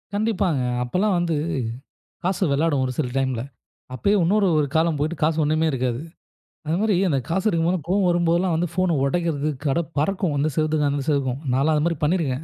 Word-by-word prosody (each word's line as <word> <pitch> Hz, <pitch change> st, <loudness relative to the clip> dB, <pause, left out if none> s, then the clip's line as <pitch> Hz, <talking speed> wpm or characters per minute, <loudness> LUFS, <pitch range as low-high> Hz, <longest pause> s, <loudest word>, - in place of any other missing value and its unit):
கண்டிப்பாங்க. 200 Hz, -, 0 dB, 0.2 s
அப்பல்லாம் 185 Hz, +10 st, 0 dB
வந்து 170 Hz, -2 st, 0 dB, 0.9 s
காசு 185 Hz, +1 st, -1 dB
விளையாடும் 145 Hz, -1 st, +1 dB
ஒரு 130 Hz, -, -2 dB
சில 140 Hz, -, 0 dB
டைம்ல. 130 Hz, -3 st, 0 dB, 0.5 s
அப்பயே 200 Hz, +10 st, +1 dB
இன்னொரு 200 Hz, +3 st, +3 dB
ஒரு 150 Hz, -, +2 dB
காலம் 160 Hz, -2 st, +2 dB
போயிட்டு 155 Hz, +4 st, -1 dB
காசு 155 Hz, +1 st, +2 dB
ஒண்ணுமே 155 Hz, +2 st, +1 dB
இருக்காது. 125 Hz, -2 st, -1 dB, 0.7 s
அது 160 Hz, -, +1 dB
மாரி 215 Hz, -3 st, +2 dB
அந்த 140 Hz, -, +1 dB
காசு 190 Hz, +5 st, -1 dB
இருக்கும்போதுலாம் 170 Hz, -1 st, 0 dB
கோவம் 190 Hz, 0 st, +2 dB
வரும்போதெல்லாம் 175 Hz, 0 st, +2 dB
வந்து 175 Hz, +2 st, 0 dB
ஃபோன 185 Hz, -3 st, +1 dB
ஒடைக்கிறது, 155 Hz, -1 st, 0 dB, 0.2 s
கடை 145 Hz, +5 st, +2 dB, 0.2 s
பறக்கும் 185 Hz, -2 st, 0 dB
இந்த 155 Hz, +2 st, +1 dB
செவத்துக்கும், 155 Hz, -2 st, +1 dB
அந்த 140 Hz, -1 st, -2 dB
செவத்துக்கும் 135 Hz, -3 st, 0 dB
நான்லாம் 145 Hz, +4 st, +2 dB
அதுமாரி 165 Hz, +2 st, 0 dB
பண்ணிருக்கேன் 150 Hz, -4 st, 0 dB
160 Hz, 170 wpm, -23 LUFS, 145-180 Hz, 0.9 s, இன்னொரு